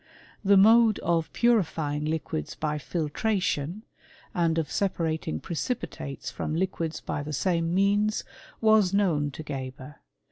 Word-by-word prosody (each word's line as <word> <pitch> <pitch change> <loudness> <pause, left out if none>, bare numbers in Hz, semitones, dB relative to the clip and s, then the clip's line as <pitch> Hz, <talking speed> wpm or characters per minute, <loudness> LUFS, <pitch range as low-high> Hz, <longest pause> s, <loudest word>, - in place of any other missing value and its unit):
"^ - - -33 0.4
The 200 0 +5
mode 220 +2 +6
of 165 -2 0
punfying 160 -10 +1
liquids 150 - -3
by 150 -1 -2
filtration, 170 +3 -1 0.5
andjrfl. 165 -3 +1
separating 160 - -1
precipitates 150 - -4
from 155 - -3
liquids 165 -2 -2
by - - -3
the 150 +1 -5
same 165 +3 0
metttlff 205 +2 +2 0.4
was 215 -4 +4
known 165 -8 +2
to 150 +3 -8
Geber. 130 -1 -7
165 Hz, 120 wpm, -27 LUFS, 150-200 Hz, 0.5 s, mode